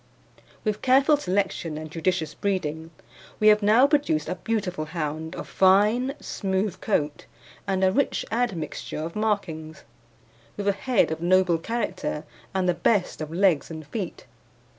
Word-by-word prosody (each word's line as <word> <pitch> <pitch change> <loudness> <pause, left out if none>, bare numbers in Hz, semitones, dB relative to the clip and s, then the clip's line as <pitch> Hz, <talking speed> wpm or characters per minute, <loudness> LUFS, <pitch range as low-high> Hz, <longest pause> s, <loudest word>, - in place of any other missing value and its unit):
With 215 -1 -1
careful 270 +4 +5
selection 185 - -1
and 155 0 -7
judicious 165 -1 -1
breeding 165 -5 -2 0.5
we 215 - +6
have 210 0 +5
now 220 +6 +5
produced 285 - +1
a - - 0
beautiful 185 -4 -2
hound 160 +1 -4
of - - -6
fine 210 +8 +3
smooth 190 -1 -2
coat, 150 -8 -1 0.4
and 190 -1 0
a 190 - +5
rich 280 +7 0
admixture 220 -10 -2
of 160 +2 -5
markings, 185 -8 -2 0.7
with 205 -1 -3
a - - +5
head 220 -1 +1
of 160 - -4
noble 180 -1 +3
character 185 -6 -3 0.3
and 190 -1 0
the 180 - +3
best 180 +1 +1
of 155 0 -5
legs 175 -3 +2
and 160 -2 -7
feet. 195 +3 -5
185 Hz, 145 wpm, -25 LUFS, 160-210 Hz, 0.7 s, we